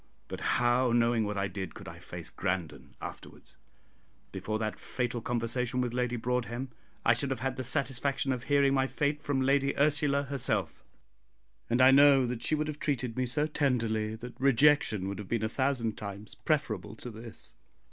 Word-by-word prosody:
But -, -, -6 dB, 0.2 s
how, 120 Hz, +1 st, +3 dB
knowing 115 Hz, -1 st, +3 dB
what 105 Hz, 0 st, -3 dB
I 100 Hz, 0 st, 0 dB
did, 95 Hz, -1 st, -6 dB
could -, -, -10 dB
I -, -, -9 dB
face -, -, -9 dB
Grandon 90 Hz, -4 st, -4 dB
afterwards? -, -, -10 dB, 0.7 s
Before 100 Hz, +3 st, -3 dB
that 110 Hz, -1 st, -3 dB
fatal 125 Hz, -2 st, -3 dB
conversation 120 Hz, +2 st, -1 dB
with 125 Hz, -2 st, -1 dB
Lady 125 Hz, -1 st, 0 dB
Broadhem, 125 Hz, +1 st, -2 dB, 0.3 s
I 115 Hz, -, +6 dB
should 130 Hz, +4 st, -2 dB
have 130 Hz, -4 st, -3 dB
had 135 Hz, 0 st, -1 dB
the 130 Hz, -, -4 dB
satisfaction 135 Hz, +2 st, -1 dB
of 125 Hz, -1 st, -3 dB
hearing 140 Hz, -1 st, +3 dB
my 135 Hz, -1 st, +2 dB
fate 145 Hz, +2 st, -1 dB
from 145 Hz, -3 st, 0 dB
Lady 140 Hz, +1 st, +2 dB
Ursula 145 Hz, -1 st, +2 dB
herself, 110 Hz, -, -2 dB, 0.9 s
and 120 Hz, +2 st, +2 dB
I 130 Hz, -, +8 dB
know 140 Hz, -1 st, +7 dB
that 120 Hz, -1 st, -3 dB
she 155 Hz, -, +1 dB
would 150 Hz, 0 st, -1 dB
have 150 Hz, -1 st, -5 dB
treated 125 Hz, -5 st, -1 dB
me 130 Hz, 0 st, 0 dB
so 145 Hz, +5 st, 0 dB
tenderly 115 Hz, -8 st, 0 dB
that 120 Hz, +2 st, -8 dB
rejection 135 Hz, -7 st, +4 dB
would 100 Hz, +1 st, -4 dB
have 105 Hz, -, -7 dB
been 115 Hz, -2 st, 0 dB
a -, -, +2 dB
thousand 125 Hz, -2 st, -1 dB
times 100 Hz, 0 st, -7 dB
preferable 110 Hz, -, -2 dB
to 120 Hz, +2 st, -8 dB
this. 115 Hz, +1 st, -11 dB
125 Hz, 180 wpm, -30 LUFS, 110-140 Hz, 0.9 s, I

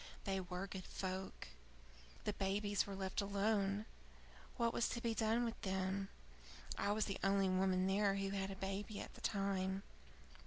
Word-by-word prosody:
They 195 Hz, -1 st, 0 dB
were 180 Hz, +1 st, -3 dB
good 190 Hz, -2 st, -6 dB
folk. 190 Hz, 0 st, -4 dB, 0.7 s
The -, -, 0 dB
babies 205 Hz, +1 st, +1 dB
were 200 Hz, -, -4 dB
left 190 Hz, +1 st, -1 dB
alone. 200 Hz, 0 st, +2 dB, 0.7 s
What 235 Hz, -2 st, +2 dB
was 235 Hz, -, +2 dB
to -, -, -1 dB
be 235 Hz, -1 st, +1 dB
done 225 Hz, +2 st, +3 dB
with 230 Hz, -, -3 dB
them? 190 Hz, 0 st, 0 dB, 0.7 s
I 200 Hz, -, +1 dB
was 215 Hz, +1 st, +2 dB
the 195 Hz, -, -2 dB
only 195 Hz, -1 st, +4 dB
woman 185 Hz, 0 st, +3 dB
there 195 Hz, +1 st, +3 dB
who 195 Hz, 0 st, 0 dB
had 195 Hz, -1 st, -1 dB
a 195 Hz, -, -4 dB
baby 195 Hz, +2 st, -3 dB
at -, -, -6 dB
the -, -, -12 dB
time. 195 Hz, -1 st, 0 dB
195 Hz, 165 wpm, -40 LUFS, 190-205 Hz, 0.7 s, only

